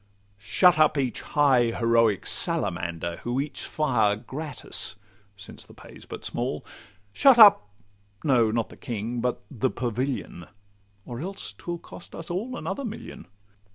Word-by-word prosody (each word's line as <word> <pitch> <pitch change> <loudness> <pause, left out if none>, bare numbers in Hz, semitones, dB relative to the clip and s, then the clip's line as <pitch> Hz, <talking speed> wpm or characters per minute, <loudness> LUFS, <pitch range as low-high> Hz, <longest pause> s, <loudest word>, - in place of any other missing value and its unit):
Shut 160 - +4
up 155 -1 +4
each 130 -3 -1
high 135 -5 +3
heroic 115 -3 +2
salamander, 85 0 -2
Who 120 +2 -3
eats 145 +1 -4
fire 120 -9 +1
gratis 145 +5 -2 0.4
(since 95 - -11
the - - -17
pay - - -14
's - - -14
but - - -7
small); - - -3 0.5
Shut 270 - +6
up—no, 105 - +4
not 115 0 -1
the - - -14
King, 120 +1 -4
but 125 0 -2
the 130 -1 0
Pavilion, 125 -7 -4 0.6
Or 120 -1 -7
else 190 +6 -6
'twill 175 0 -6
cost 170 - -13
us 165 +1 -7
all 230 +8 -3
another 280 - -4
million. 225 - -8
125 Hz, 140 wpm, -26 LUFS, 110-155 Hz, 0.6 s, Shut